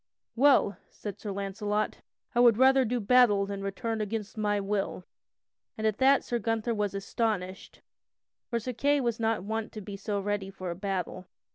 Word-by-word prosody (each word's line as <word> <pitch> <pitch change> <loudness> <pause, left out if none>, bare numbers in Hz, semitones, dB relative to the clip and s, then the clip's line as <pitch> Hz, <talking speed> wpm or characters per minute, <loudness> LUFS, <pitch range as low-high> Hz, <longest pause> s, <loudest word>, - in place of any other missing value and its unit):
"Well," 255 -5 +4
said 205 -1 -8
Sir 210 - -5
Launcelot, 200 +2 -2 0.4
"I 240 - +1
would 240 -3 +6
rather 265 +1 +5
do 245 +2 -1
battle 215 -3 +4
than 200 0 -5
return 220 +3 -3
against 215 0 -4
my 210 -1 0
will." 195 -2 -2 0.7
And 220 - -3
at 215 -2 +1
that 270 +1 +5
Sir 240 - -2
Gunther 225 +1 -1
was 205 -2 -1
astonished, 195 -2 -3 0.7
for 235 - 0
Sir 250 +3 -4
Kay 285 +4 +2
was 235 -3 -1
not 225 -4 0
wont 220 +2 -3
to 215 - -6
be 200 0 -7
so 200 +1 -2
ready 200 -1 -2
for 185 -2 -6
a - - -5
battle. 185 -1 -4
210 Hz, 175 wpm, -29 LUFS, 200-235 Hz, 0.7 s, would